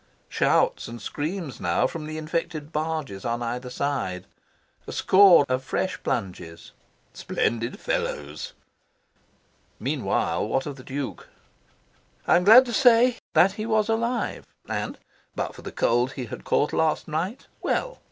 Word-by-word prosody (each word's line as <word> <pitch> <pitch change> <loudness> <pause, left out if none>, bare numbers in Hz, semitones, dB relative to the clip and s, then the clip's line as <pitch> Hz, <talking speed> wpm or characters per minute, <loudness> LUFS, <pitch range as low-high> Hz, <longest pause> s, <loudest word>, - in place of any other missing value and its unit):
Shouts - - +2
and 115 0 -8
screams 150 - -4
now 85 -1 +1
from 155 -2 -4
the 155 0 -5
infected 155 -1 -3
barges 155 -10 -3
on 120 +1 -2
either 125 +2 -4
side. 125 -10 -2 0.6
A - - -5
score 190 -6 +6
of 130 +1 -1
fresh 185 +7 -2
plunges. 90 -6 -4 0.4
"Splendid 115 +1 -2
fellows!" 75 +1 -3 1.3
Meanwhile, - - -1
what 135 - 0
of 145 -2 -6
the 130 - -11
Duke? 135 +1 -5 1.0
I - - +5
am 180 - +3
glad 235 +5 +9
to 240 - -5
say 245 +1 +5
that 190 - +5
he 215 +3 -5
was 220 -1 +1
alive 235 +1 -1 0.2
and - - -3 0.4
(but - - -3
for - - -12
the - - -7
cold 120 +3 +1
he 130 - -5
had 110 - -8
caught 150 - +1
last 160 -1 +1
night) 170 - -3 0.2
well. - - -1
150 Hz, 140 wpm, -25 LUFS, 120-195 Hz, 1.3 s, glad